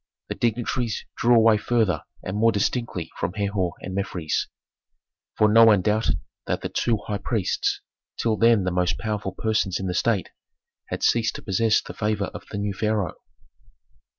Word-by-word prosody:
The - - -1
dignitaries 120 0 -1
drew 120 +1 +4
away 115 -1 +6
farther 110 -9 +1 0.2
and 95 - -4
more 115 +2 +4
distinctly 105 -3 -2
from - - -2
Herhor 100 -4 -1
and 95 - -6
Mefres, 90 -5 -2 0.9
for 110 - +5
no 115 +2 +7
one 105 -5 +5
doubted 110 +3 +1 0.3
that - - -1
the - - -3
two 115 -2 +1
high 105 -1 -3
priests, 105 -1 -1 0.4
till 115 -2 +1
then 115 -2 +4
the 90 - -1
most 90 0 0
powerful 105 -4 -3
persons 110 -4 0
in 95 - -4
the 90 - -1
state, 105 +1 0 0.6
had - - -4
ceased 115 -1 +2
to - - -8
possess 105 +2 +2
the - - -8
favor 105 -2 -1
of - - -9
the 100 - -5
new 100 0 -2
pharaoh. 105 -4 -1
105 Hz, 170 wpm, -24 LUFS, 95-115 Hz, 0.9 s, no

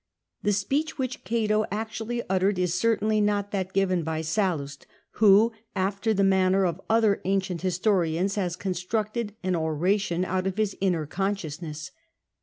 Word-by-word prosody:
The 205 - +1
speech 280 +11 -1
which 260 -1 -3
Cato 215 -2 +1
actually 225 +2 -3
uttered 190 +1 +1
is 180 -2 0
certainly 215 +2 +2
not 205 -1 0
that 190 -2 -2
given 185 -2 +1
by 160 0 -2
Sallust, 155 -5 -2 0.3
who, 215 +2 +6 0.2
after 195 +3 0
the 200 -2 +2
manner 190 0 +3
of 175 +1 -2
other 220 -3 +3
ancient 190 -2 -1
historians, 185 -1 +1
has 180 -4 -1
constructed 205 +4 -2
an 185 -1 +1
oration 175 +3 0
out 185 0 -1
of 190 +1 -3
his 215 -2 0
inner 175 -5 +1
consciousness. 165 -4 -4
195 Hz, 145 wpm, -26 LUFS, 180-210 Hz, 0.3 s, who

